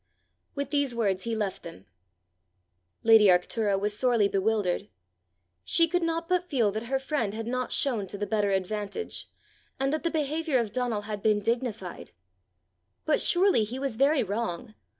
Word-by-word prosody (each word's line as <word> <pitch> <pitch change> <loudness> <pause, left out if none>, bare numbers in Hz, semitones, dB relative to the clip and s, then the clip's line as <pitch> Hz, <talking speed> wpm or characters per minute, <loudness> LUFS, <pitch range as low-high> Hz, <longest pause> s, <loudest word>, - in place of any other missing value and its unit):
With 280 -1 -3
these 285 -4 +1
words 200 -4 0
he 230 -1 -1
left 205 -3 -3
them. 165 - -11 1.2
Lady 225 -2 +7
Arctura 195 +3 +2
was 205 +1 -1
sorely 235 -2 +3
bewildered. 200 -1 0 0.7
She 330 0 +3
could 355 +2 0
not 330 0 -1
but 360 0 0
feel 235 -8 +2
that 220 +3 -5
her 270 +2 +1
friend 265 -7 -2
had 225 0 -4
not 255 +1 -2
shown 230 -8 0
to 200 - -5
the 205 - -2
better 210 -1 0
advantage, 205 - -3 0.5
and 270 +2 0
that 310 - -1
the 335 - 0
behaviour 310 -1 0
of 230 -4 -1
Donal 245 -3 -1
had 205 -1 -5
been 210 -1 +3
dignified. 225 -4 -3 0.9
But 305 - +2
surely 365 - +3
he 230 +5 -5
was 270 -3 -2
very 275 +3 +3
wrong! 215 +1 -4
230 Hz, 165 wpm, -27 LUFS, 205-275 Hz, 1.2 s, Lady